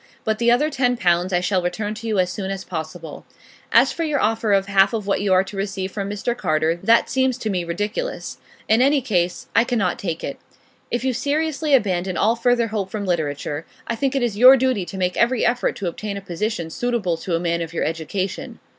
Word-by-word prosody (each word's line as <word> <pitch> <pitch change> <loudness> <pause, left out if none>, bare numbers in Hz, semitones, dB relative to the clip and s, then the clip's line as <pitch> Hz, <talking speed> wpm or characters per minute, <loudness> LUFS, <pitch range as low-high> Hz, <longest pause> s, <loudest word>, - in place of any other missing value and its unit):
But 220 0 -1
the 235 0 +3
other 295 +6 +3
ten 250 -3 +1
pounds 175 -1 +2
I 175 -1 +2
shall 185 0 +1
return 205 +4 -2
to 225 +1 -7
you 215 -2 0
as 180 -1 +2
soon 195 -2 -4
as 195 -1 -4
possible. 160 -2 -7 0.5
As - - +5
for 335 - -3
your 300 -3 0
offer 220 -1 +1
of 195 -1 +3
half 195 +2 +3
what 205 -3 -1
you 200 -1 0
are 185 0 +5
to 195 +1 -10
receive 195 -1 -3
from 200 0 -4
Mr 210 +4 -2
Carter, 160 -5 +1
that 230 +1 +4
seems 260 -2 +1
to 220 -4 -3
me 180 -2 -1
ridiculous; 205 - -4 0.3
in 220 +2 +4
any 280 +2 +4
case, 180 -8 -1
I 230 - +6
cannot 225 -7 0
take 165 -4 -4
it. - - -5 0.5
If 240 - -2
you 260 -1 +1
seriously 300 +3 +1
abandon 185 -6 0
all 225 +3 +3
further 235 -1 +2
hope 205 -3 -3
from 205 -1 -4
literature, 150 -3 -2 0.2
I 230 - -2
think 270 +3 -1
it 270 - +1
is 215 -4 -1
your 255 +2 +9
duty 255 -7 0
to 190 - -8
make 180 -1 0
every 240 0 +2
effort 245 +1 +1
to 195 - -4
obtain 200 +4 -4
a - - -6
position 180 -2 -3
suitable 230 -5 -1
to 170 +1 -2
a - - 0
man 170 0 -1
of 165 -1 -4
your 170 - -2
education. 165 +5 -3
205 Hz, 225 wpm, -22 LUFS, 180-240 Hz, 0.5 s, your